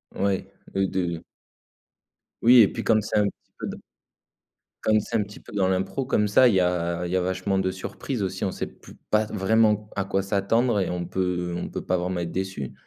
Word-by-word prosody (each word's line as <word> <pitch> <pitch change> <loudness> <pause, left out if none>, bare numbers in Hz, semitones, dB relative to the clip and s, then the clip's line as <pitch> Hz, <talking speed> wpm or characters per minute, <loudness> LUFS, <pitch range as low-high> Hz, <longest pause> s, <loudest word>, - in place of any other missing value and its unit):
Ouais, 100 -1 -1 0.2
heu, 95 0 +2
de 85 -3 -2 1.2
Oui 120 +1 +8
et 100 - +7
puis, - - -5
comme 110 -1 +3
c'est 105 - -2
un 105 - +5
petit - - -10
peu - - -5
dans - - -5 1.1
comme 110 0 +4
c'est 115 +2 -5
un 105 - +1
petit 105 +2 -12
peu - - -15
dans 95 -2 +2
l'impro 95 +8 -1
comme 105 -5 +2
ça, 125 +5 +6
il 115 - +3
y - - +5
a 90 -1 0
il 90 - -4
y - - 0
a 90 - +2
vachement 95 +2 -1
de 95 0 0
surprises 105 +5 -5
aussi, 95 +1 -2
on 95 - -1
sait - - -4
pu - - -15 0.2
pas 110 0 +3
vraiment 105 +1 +2
à 100 -1 -1
quoi 95 0 0
s'attendre 100 +4 +1
et 95 - 0
on 90 -1 -3
peut 90 -2 -2
on - - -4
peut - - -5
pas 90 - +1
vraiment 90 0 -2
être 85 -1 -3
déçu. 95 -8 -4
95 Hz, 225 wpm, -25 LUFS, 90-105 Hz, 1.2 s, Oui